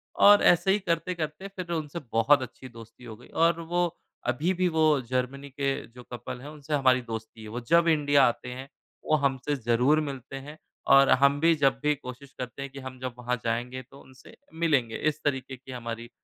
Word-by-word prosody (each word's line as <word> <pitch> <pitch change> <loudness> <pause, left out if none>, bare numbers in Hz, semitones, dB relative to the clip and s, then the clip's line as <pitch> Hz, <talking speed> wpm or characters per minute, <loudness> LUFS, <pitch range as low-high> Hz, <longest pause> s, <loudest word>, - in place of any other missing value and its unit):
और 205 0 +7
ऐसे 175 +2 +5
ही 205 - +2
करते-करते 170 -1 -3
फिर 185 -3 -7
उनसे 160 0 -3
बहुत 130 +5 +4
अच्छी 130 +1 -8
दोस्ती 115 +1 -14
हो 115 -2 -8
गई 120 +3 -17
और 165 +1 +2
वो 175 +2 0 0.4
अभी 155 +10 +1
भी 185 0 +2
वो 155 -3 +3
जर्मनी 130 +2 -2
के 140 0 -1 0.2
जो 125 +2 -14
कपल 120 +1 -6
हैं 140 - -9
उनसे 150 0 -7
हमारी 130 -3 +3
दोस्ती 110 0 -7
है। - - -9
वो 120 +3 -4
जब 170 +1 +5
इंडिया 145 -3 +4
आते 120 +1 -3
हैं 130 +2 -7 0.4
वो 155 - +5
हमसे 140 +1 0
ज़रूर 125 +4 +2
मिलते 135 -2 -6
हैं 145 +3 -9 0.4
और 135 0 +7
हम 140 +1 +4
भी 165 +2 +4
जब 135 -3 +2
भी 150 - +3
कोशिश 135 0 -10
करते 125 +2 -6
हैं 140 - -6
कि 135 - -9
हम 130 -1 -8
जब 130 -1 -4
वहाँ 125 0 -1
जाएँगे 120 +3 -2
तो 140 - -14
उनसे 130 0 -17 0.2
मिलेंगे। 140 -9 +1
इस 155 0 -1
तरीके 135 -2 -2
की 130 +1 -12
हमारी 115 -1 -6
135 Hz, 205 wpm, -27 LUFS, 125-155 Hz, 0.4 s, और